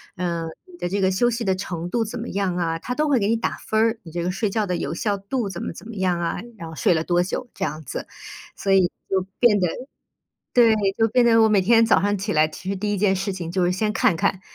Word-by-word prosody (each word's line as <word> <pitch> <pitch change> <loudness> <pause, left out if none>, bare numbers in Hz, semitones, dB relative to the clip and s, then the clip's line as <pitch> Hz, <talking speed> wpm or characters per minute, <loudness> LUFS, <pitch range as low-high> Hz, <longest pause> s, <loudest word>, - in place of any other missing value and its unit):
嗯， 170 -2 -2 0.2
你 350 - -14
的 - - -3
这 200 +1 -1
个 190 0 +3
休 240 +6 +2
息 235 0 -2
的 190 -2 +2
程 175 -2 -5
度 230 +1 0
怎 215 - -6
么 230 - -5
样 195 -2 -1
啊， 165 -2 -1
它 250 +8 -4
都 305 0 +1
会 265 - +3
给 200 - +1
你 230 - +2
打 230 - -2
分 220 - -3
儿。 225 0 +1
你 165 - -11
这 170 0 -3
个 180 - 0
睡 200 +2 -1
觉 215 +1 0
的 180 -2 -1
有 140 - -3
效 200 +3 -1
度 200 +2 -3
怎 175 - -6
么 - - -4
怎 - - -12
么 230 - -8
样 185 -2 0
啊， 170 - -1 0.2
然 165 -5 -7
后 160 - -9
睡 175 - +3
了 160 0 0
多 175 +1 +2
久 240 +6 -4
这 195 - -2
样 155 +2 -5
子， - - -6 0.5
所 195 - -2
以 185 -2 +5 0.2
就 190 -1 +2 0.2
变 215 -5 +5
得 180 - +2 0.9
对， 230 -3 +6 0.2
就 225 0 +4
变 240 +3 +3
得 225 -1 +5
我 220 - +5
每 200 -3 +3
天 230 +3 +5
早 - - +4
上 205 0 +1
起 205 +3 -2
来， 155 0 +5
其 180 +4 -9
实 195 - -1
第 210 +2 -2
1 200 - -1
件 195 -1 +2
事 195 +2 -2
情 175 -3 -5
就 180 0 +1
是 175 - +2
先 210 +3 0
看 225 -4 +3
看， 185 +3 0
195 Hz, 300 characters per minute, -23 LUFS, 175-225 Hz, 0.9 s, 对